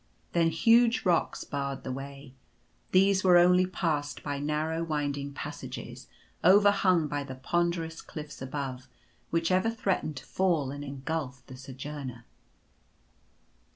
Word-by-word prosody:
Then 170 -1 +3
huge 230 +8 +4
rocks 175 -3 +1
barred 140 -1 -4
the 130 - -4
way. 135 0 -8 0.6
These 190 +1 +4
were 180 -2 +7
only 180 +1 +5
passed 155 -5 -2
by 145 -1 -3
narrow, 155 +3 -1
winding 145 -3 -2
passages, - - -7 0.4
overhung 190 -3 +5
by 145 0 -2
the 135 -1 -7
ponderous 165 +3 -1
cliffs 150 -3 -9
above, 130 -1 -5 0.4
which 165 +1 0
ever 185 +5 +3
threatened 195 -8 -1
to - - -8
fall 165 -8 +1
and 145 +1 -6
engulph 140 -1 -4
the 130 - -10
Sojourner. 130 -2 -7
150 Hz, 125 wpm, -29 LUFS, 140-180 Hz, 0.6 s, were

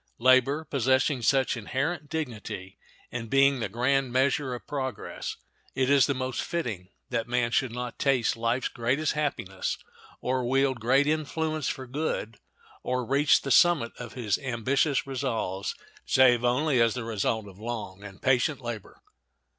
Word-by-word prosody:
Labor, 130 +5 +4
possessing 130 0 +1
such 135 +2 +2
inherent 145 +7 -3
dignity 110 -11 -5 0.3
and 115 -2 -5
being 135 +1 +4
the 110 - -2
grand 130 +4 +1
measure 130 0 +1
of 120 - -10
progress, 130 -6 -4 0.4
it 130 +1 +2
is 140 0 +5
most 130 -2 -1
fitting 120 - -3 0.2
that 115 -1 -1
man 120 -1 0
should 130 0 +1
not 125 0 -5
taste 135 -5 +2
life's 115 +2 0
greatest 130 +7 0
happiness, 140 -11 -2 0.4
or 130 0 -1
wield 135 +1 +1
great 130 +5 +3
influence 155 0 -1
for 130 -2 -4
good, 125 -5 -3 0.4
or 125 -1 -1
reach 140 +4 +3
the 135 - -3
summit 155 -6 +5
of 120 -2 -7
his 110 -5 -1
ambitious 135 +3 0
resolves, 120 -8 -2 0.3
save 125 -2 +4
only 125 +2 +2
as 115 0 +3
the 125 - -3
result 110 -1 -1
of 95 0 -13
long 105 -4 -6
and 100 -1 -11
patient 135 +2 +2
labor. 120 -4 -7
130 Hz, 145 wpm, -27 LUFS, 115-140 Hz, 0.4 s, is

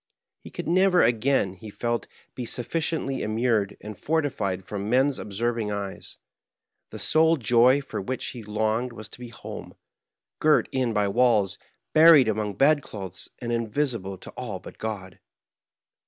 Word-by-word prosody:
He - - -12
could - - -6
never 180 +1 +4
again, 120 -3 +2
he 110 +3 -11
felt, 120 +3 -2 0.3
be 125 - -5
sufficiently 135 +2 -2
immured 110 -2 0
and 105 0 -7
fortified 105 - -1
from 100 0 -4
men's 130 +3 +2
observing 115 +1 -2
eyes; 100 -1 -6 0.7
the - - -8
sole 160 +1 +4
joy 125 +3 +4
for 135 - -5
which 130 +6 -4
he 120 - -8
longed 110 +3 -1
was 110 -2 -8
to - - -13
be 125 - -7
home, 115 - -9 0.6
girt - - +4
in 130 -3 0
by 105 -2 +1
walls, 105 -3 +2 0.3
buried 155 -5 +8
among 105 -2 -1
bedclothes, 110 - 0
and 120 - -2
invisible 115 -4 -1
to - - -10
all 115 -6 -5
but 95 - -13
God. 100 -5 -5
115 Hz, 145 wpm, -25 LUFS, 105-130 Hz, 0.7 s, buried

